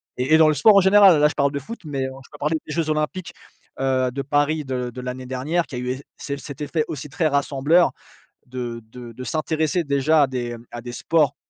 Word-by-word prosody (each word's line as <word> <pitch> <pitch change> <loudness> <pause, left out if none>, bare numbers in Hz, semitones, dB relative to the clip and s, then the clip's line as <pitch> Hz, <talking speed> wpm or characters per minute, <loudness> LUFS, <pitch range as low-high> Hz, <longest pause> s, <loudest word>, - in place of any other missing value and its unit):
et 130 +5 0
et - - +7
dans 160 -1 +6
le 155 - +4
sport 200 +9 +5
en - - +7
général. 190 -4 +6
Là 150 - +5
je - - -3
parle 140 -1 +2
de 140 - -3
foot, 230 - -9
mais, 140 -3 -3
heu, - - -3 0.2
je - - -19
peux - - -12
parler 155 +2 0
des 150 - -6
jeux 165 -2 -1
olympiques, 160 +3 -2 0.5
heu, 130 -1 +1
de 140 +2 -3
Paris 145 +2 0
de 125 -2 -3
de 125 +1 -8
l'année 125 0 -6
dernière 140 +7 -1
qui 130 - -8
a - - -4
eu 125 0 -4
eff 130 +2 -3
celle 140 -1 -5
cet 145 0 -9
effet 155 +1 -1
aussi 150 -1 -6
très 155 +2 0
rassembleur 145 +4 +2 0.6
de 120 -2 -5
de 120 -1 -10
de 125 +3 -8
s'intéresser 160 +2 -1
déjà 145 +2 +3
à - - +5
des, 120 -2 -4
heu, 115 0 -12
à 120 - -6
des 120 - -7
sports, 150 0 +1
140 Hz, 250 wpm, -22 LUFS, 130-155 Hz, 0.6 s, et